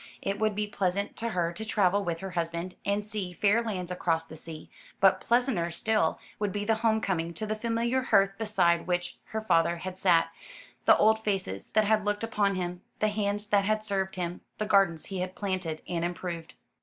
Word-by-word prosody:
It 195 0 -2
would 215 -1 +1
be 210 0 0
pleasant 200 -1 -1
to 230 - -2
her 175 -5 0
to 220 - -6
travel 200 -2 +2
with 170 -3 -3
her 190 -1 -5
husband, 170 +1 -2
and 200 +1 0
see 205 -4 -4
fair 205 +5 +3
lands 185 -6 -4
across 165 -2 0
the 160 -1 -11
sea: 160 0 -9 0.3
but 190 -1 +5
pleasanter 235 -8 +1
still 190 +1 +1 0.2
would 205 -1 0
be 205 +2 -3
the 225 - +3
home 220 -1 +2
coming 170 -4 -1
to 215 - -4
the 215 0 -1
familiar 235 +3 0
hearth 195 -6 +3
beside 185 -6 +2
which 175 0 -2
her 220 - -4
father 170 -5 +2
had 185 +2 -6
sat, 175 -4 +4 0.5
the - - +7
old 220 +1 +4
faces 190 - -2
that 215 0 +4
had 215 0 +3
looked 205 +1 -1
upon 205 -3 +1
him, 180 -1 -3 0.2
the 215 - +2
hands 205 0 -1
that 200 -1 +3
had 215 +1 +1
served 195 -2 -1
him, 175 -1 -3 0.2
the 215 - -1
gardens 195 -6 +3
he 190 -2 -5
had 185 0 -3
planted 185 -6 -3
and 170 -1 -2
improved. 175 -1 -4
195 Hz, 205 wpm, -29 LUFS, 175-215 Hz, 0.5 s, the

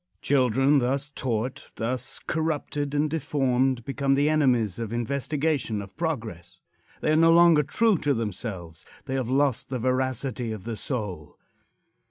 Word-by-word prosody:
Children 135 +1 +3
thus 135 +3 -1
taught 125 -2 -3
thus 125 +2 -2
corrupted 150 -2 -2
and 150 +1 +2
deformed 130 -5 0
become 135 0 +1
the 145 +2 +2
enemies 125 - +2
of 115 -2 -4
investigation 140 0 -1
of 100 -1 -9
progress. 110 - -4 0.4
They - - +1
are - - +4
no 165 +1 +5
longer 170 -2 +6
true 205 +6 +2
to 145 -2 +1
themselves. 100 -6 -5 0.2
They 130 - -4
have 130 -3 -1
lost 135 -2 +1
the 130 - -2
veracity 130 -1 -1
of 105 -4 -6
the 115 +1 -4
soul. 105 - -4
130 Hz, 145 wpm, -26 LUFS, 115-145 Hz, 0.4 s, longer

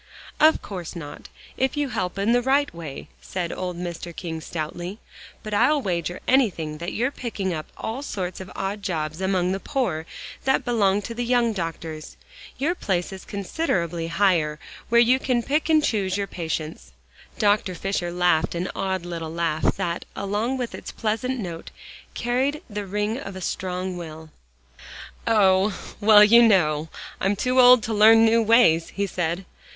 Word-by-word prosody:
"Of 310 +1 +5
course 180 -3 -7
not, 145 -3 -9 0.3
if 265 +2 0
you 290 -2 0
help 185 -5 -3
in 200 +3 +1
the 245 +1 +4
right 275 +3 +2
way," 160 -5 -8
said 175 -3 -4
old 180 -1 -4
Mr. 175 -1 -6
King 160 -2 -5
stoutly, 175 +5 -5 0.5
"but 215 - -6
I'll 295 +8 +4
wager 175 - -3
anything 175 - +1
that 170 +1 -4
you're 250 +5 0
picking 205 -9 -3
up 155 -1 -5
all 230 +5 -4
sorts 185 -9 -4
of 185 - -9
odd 200 +2 -3
jobs 160 -3 -3
among 185 -1 +1
the 195 - -2
poor, 190 - -2 0.4
that 265 - +1
belong 205 -4 +2
to 230 - -5
the 240 +1 -3
young 240 -1 +2
doctors. 165 -4 -6 0.4
Your 305 +6 +1
place 190 - -2
is 190 - -9
considerably 175 - -2
higher, 170 -4 +2 0.3
where 235 +1 +5
you 245 +2 +5
can 250 -3 0
pick 300 +5 0
and 310 -1 +4
choose 195 -7 0
your 200 - -1
patients." 160 -3 -5 0.4
Dr. 205 -3 +2
Fisher 185 -1 -2
laughed 175 -2 +2
an 175 +2 -2
odd 190 -2 -2
little 165 -2 -5
laugh, 165 -1 0
that 175 -3 -2
along 210 +6 -1
with 245 -2 -4
its - - -7
pleasant 230 +4 -2
note, 170 -5 -6 0.5
carried 260 +5 -1
the 205 -3 -5
ring 210 +5 -1
of 195 -8 -7
a - - -6
strong 185 0 -3
will. 160 -2 -9 1.0
"Oh! 195 -2 +3 0.2
well, 210 0 +8
you 230 +3 +7
know, 160 -8 +3 0.3
I'm 195 +2 +1
too 255 +5 +1
old 250 -2 +8
to 225 - -2
learn 225 +2 +7
new 230 +1 +4
ways," 220 -8 +4
he 200 - 0
said. 175 0 -2
195 Hz, 165 wpm, -24 LUFS, 170-230 Hz, 1.0 s, well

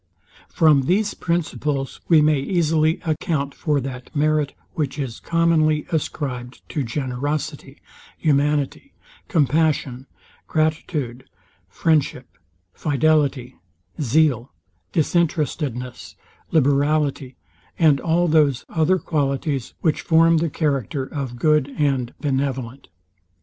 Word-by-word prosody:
From 150 -5 +3
these 205 +3 +2
principles 150 -5 -2
we 160 -3 +6
may 150 -2 +3
easily 160 +1 +1
account 155 -3 -1
for 150 -4 0
that 125 -1 -7
merit, 150 -1 +1 0.2
which 145 -4 -2
is 130 -6 -4
commonly 160 -2 +2
ascribed 130 -6 -4
to 150 - -2
generosity, 135 +3 -4 0.4
humanity, 145 - 0 0.3
compassion, 145 - +1 0.4
gratitude, 155 -5 -2 0.4
friendship, 145 - 0 0.5
fidelity, 145 -4 +1 0.4
zeal, 135 -2 +2 0.4
disinterestedness, 150 -6 -1 0.3
liberality, 140 -2 +1 0.4
and 150 -5 +4
all 170 +2 +2
those 150 -5 +3
other 170 +3 +2
qualities, 140 -5 -2
which 160 - +1
form 165 0 +4
the 165 +1 0
character 140 - -1
of 135 -3 -5
good 150 0 +2
and 135 -5 0
benevolent. 135 -2 -2
150 Hz, 95 wpm, -22 LUFS, 135-160 Hz, 0.5 s, we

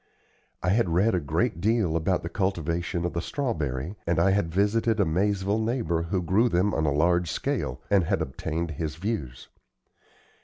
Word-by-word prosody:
I 90 - +1
had 105 -1 +2
read 95 +7 +3
a 90 - +2
great 75 +3 -1
deal 105 -6 +2
about 85 +3 0
the - - -3
cultivation 85 -2 -1
of 90 - -2
the 85 - -1
strawberry, 85 - -3
and 85 -1 +2
I 95 +3 +4
had 95 -4 +1
visited 105 +4 +1
a 100 - +4
Maizeville 100 +5 +1
neighbor 110 -8 0
who 90 +2 -1
grew 105 +8 +3
them 95 +1 +1
on 80 - +1
a - - +2
large 85 +3 +2
scale, - - -2
and 100 -4 +4
had - - 0
obtained 80 +5 -3
his 80 0 -4
views. 80 - -4
90 Hz, 180 wpm, -26 LUFS, 80-100 Hz, -, I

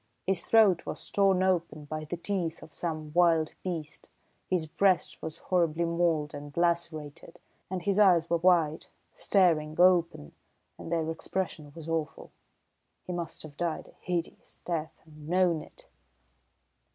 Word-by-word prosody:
His 185 -2 -1
throat 205 -6 +4
was - - -4
torn 195 -2 +3
open 170 -5 0
by 155 +1 -5
the 175 +3 -5
teeth 170 -3 -3
of 155 - -14
some 155 -3 -4
wild 165 -2 +3
beast, 165 -5 -6 0.4
his 180 -4 +1
breast 185 +2 +1
was 160 -1 -6
horribly 170 -2 +1
mauled 165 -3 0
and 145 +1 -9
lacerated, 170 -3 -1 0.3
and 185 -1 -4
his 200 +2 +1
eyes 175 -5 +5
were 170 - +2
wide, 165 -3 +2 0.3
staring 160 -6 +2
open, 175 - +3 0.5
and - - -8
their 165 -2 0
expression 165 -3 -4
was 165 -1 -9
awful. 160 -2 -3 0.7
He 180 - -4
must 170 -1 -4
have 150 -2 -11
died 170 0 -3
a - - -21
hideous 175 -2 -4
death 160 -3 -3
and 155 -1 -13
known 175 -3 +2
it!" - - -16
170 Hz, 145 wpm, -29 LUFS, 155-180 Hz, 0.7 s, eyes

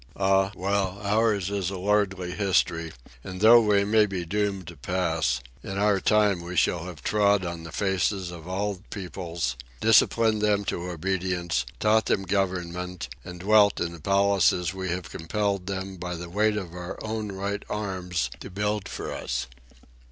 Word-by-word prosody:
Ah, 95 0 +3
well, 95 0 -1
ours 105 -2 +1
is 100 -3 -1
a 95 - -5
lordly 95 -2 0
history, 90 -4 +1 0.3
and 95 -1 -7
though 115 +3 +8
we 105 -2 +3
may 105 0 +4
be 95 -3 -4
doomed 100 0 -1
to 85 +1 -9
pass, 80 +1 0 0.2
in 95 +5 -5
our 100 -1 +3
time 105 -3 +3
we 90 +1 -6
shall 85 +1 +2
have 90 -5 -9
trod 100 -2 +3
on 85 -1 -4
the 80 0 -9
faces 95 -1 0
of 85 -1 -10
all 95 0 -2
peoples, 85 - -4 0.2
disciplined 110 - +4
them 105 -1 +2
to 90 -1 -3
obedience, 90 0 -1
taught 110 +1 +3
them 95 - +1
government, 90 -4 -2
and 90 -1 -9
dwelt 105 +1 +5
in 85 - -1
the 85 - -10
palaces 100 -2 +3
we 95 -1 -4
have 85 0 -4
compelled 100 +2 -2
them 95 -1 -4
by 90 0 -4
the 85 +1 -7
weight 105 +2 +2
of 90 -5 -5
our 90 +1 -6
own 110 -1 -3
right 100 +1 -3
arms 90 - -2
to - - -8
build 105 +1 -2
for - - -5
us. - - -3
95 Hz, 165 wpm, -26 LUFS, 90-100 Hz, 0.3 s, though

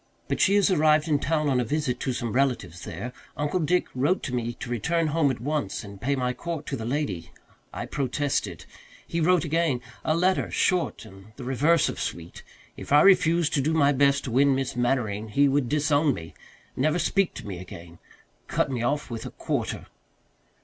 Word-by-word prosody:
But - - -1
she 200 - +4
has 205 -1 +4
arrived 155 -2 +3
in 150 -3 +2
town 155 +1 0
on 130 -3 +2
a - - +2
visit 130 0 -1
to 130 - -1
some 120 -2 -3
relatives 115 -10 -1
there. 100 +10 -6 0.2
Uncle 150 +5 0
Dick 180 +3 +2
wrote 145 +9 +1
to 125 - -4
me 120 -1 -2
to 125 - -8
return 165 +8 0
home 160 -3 +3
at 130 - -2
once 145 +1 -2
and 100 -1 -11
pay 140 +3 +1
my 125 -1 -1
court 170 +2 -5
to - - -3
the 115 -4 -5
lady; 105 - -2 0.4
I - - -5
protested. 135 - -2 0.4
He 170 - -2
wrote 175 0 +3
again 160 -4 +1 0.2
a 155 - +1
letter, 185 +2 +1
short 180 -9 0
and 95 +1 -15
the 135 - -9
reverse 145 +6 +2
of - - -4
sweet. 85 0 -5 0.3
If - - -10
I 145 +1 +7
refused 175 -4 +4
to 140 - +2
do 155 +4 0
my 145 -2 +4
best 140 0 +3
to 125 - -5
win 135 +3 +4
Miss 135 -2 -2
Mannering 120 -4 0
he 140 +7 +3
would 135 -3 +1
disown 150 -1 +2
me 80 -2 -9 0.4
never 155 +5 +1
speak 195 +1 +1
to - - -8
me 95 -4 -6
again 85 -2 -11 0.5
cut - - 0
me 125 -3 -2
off 140 +3 -1
with 115 -1 -5
a - - -6
quarter. - - -3
140 Hz, 200 wpm, -26 LUFS, 120-155 Hz, 0.5 s, I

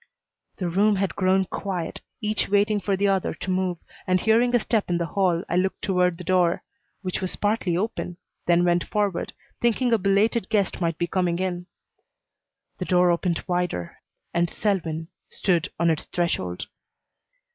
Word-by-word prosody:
The 180 - -2
room 200 +5 +3
had 195 0 -1
grown 190 0 +3
quiet, 185 -3 -4 0.2
each 215 0 +1
waiting 205 +1 +3
for 200 -1 0
the 200 +1 +2
other 195 -2 +1
to 185 - -4
move, 185 -1 0 0.3
and, 185 0 +3
hearing 230 +4 +3
a - - +5
step 215 -2 0
in 175 - +2
the 170 - -1
hall, 180 -1 +1
I - - -1
looked 190 +1 0
toward 180 -3 +2
the 180 - -7
door, 180 -1 +2 0.4
which 185 0 -2
was 185 - -2
partly 205 -5 0
open, 180 -3 -3 0.3
then 175 0 +4
went 175 0 +3
forward, 205 -4 -1 0.3
thinking 240 +1 +2
a 225 - +4
belated 200 +2 +2
guest 200 -4 0
might 165 -2 0
be 175 - 0
coming 175 -1 0
in. 180 -1 -3 1.1
The 180 - -2
door 180 -1 +4
opened 170 0 0
wider 175 - -2 0.3
and 170 0 +2
Selwyn 165 -6 -1 0.2
stood 180 0 0
on 170 0 +4
its 155 - -2
threshold. 95 - -2
185 Hz, 170 wpm, -25 LUFS, 175-200 Hz, 1.1 s, a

